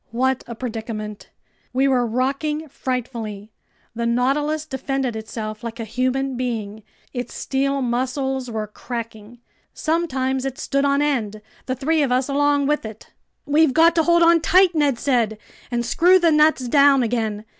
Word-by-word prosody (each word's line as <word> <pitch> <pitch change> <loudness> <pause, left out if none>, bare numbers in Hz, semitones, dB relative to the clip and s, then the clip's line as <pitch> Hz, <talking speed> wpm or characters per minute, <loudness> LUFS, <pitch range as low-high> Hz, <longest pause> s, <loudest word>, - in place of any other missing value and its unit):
What 260 +2 0
a 235 - -6
predicament! 220 -3 -6 0.4
We 265 +2 +2
were 250 -3 +2
rocking 275 +6 -1
frightfully. 230 -6 -5 0.4
The 235 0 -2
Nautilus 290 +6 0
defended 270 -3 -3
itself 220 0 -6
like 230 0 -6
a - - -3
human 255 +4 -1
being. 220 -4 -4 0.3
Its 245 -1 -5
steel 275 0 -1
muscles 260 +1 -2
were 220 -2 -3
cracking. 230 0 -8 0.4
Sometimes 265 -6 -1
it 270 -1 -4
stood 275 0 0
on 280 +1 +2
end, 225 -8 -1 0.3
the 260 - -1
three 305 +5 +1
of 275 -3 +1
us 255 +1 +1
along 285 0 +2
with 295 +1 0
it! 220 -1 -10 0.3
"We've 295 -1 +3
got 330 +1 +6
to 335 - +3
hold 340 +1 +4
on 335 0 +5
tight," 365 +2 +4
Ned 290 -5 +1
said, 235 -5 0 0.3
"and 240 -1 -1
screw 360 +8 +5
the 340 -3 +3
nuts 300 -4 +3
down 280 0 +5
again! 220 -2 -2
260 Hz, 155 wpm, -21 LUFS, 235-290 Hz, 0.4 s, got